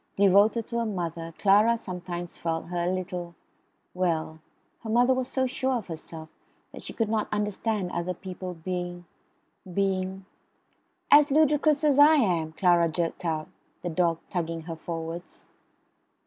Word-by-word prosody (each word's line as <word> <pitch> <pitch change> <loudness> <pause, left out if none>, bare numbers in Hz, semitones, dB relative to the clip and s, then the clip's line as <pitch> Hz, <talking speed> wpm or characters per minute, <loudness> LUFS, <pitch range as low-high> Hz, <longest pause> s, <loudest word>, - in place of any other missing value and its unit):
Devoted 200 +3 +4
to 235 -1 -3
her 230 - 0
mother, 170 -4 -4
Clara 210 +4 +4
sometimes 180 -4 -6
felt 165 0 -3
her 175 -1 -1
a 180 - +1
little, 180 -2 -4 0.6
well, 165 -3 -1 0.4
her 225 - -7
mother 245 +3 +4
was 255 -1 -1
so 260 0 0
sure 260 +1 -1
of 230 -7 -3
herself 160 0 -7 0.4
that - - -10
she - - -7
could 225 - -1
not 215 0 0
understand 210 -2 -1
other 180 +1 -2
people 185 0 -7
being 175 +1 -5 0.7
being 190 0 -1 0.9
"as 295 0 +8
ludicrous 300 0 +3
as 290 -2 +4
I 300 +2 +8
am," 175 - +1
Clara 175 -1 +3
jerked 165 +2 -3
out 155 -2 -2 0.3
(the 175 - -2
dog 170 0 +1
tugging 165 -2 -3
her 165 0 -6
forwards). 165 +1 -7
185 Hz, 150 wpm, -27 LUFS, 170-225 Hz, 0.9 s, as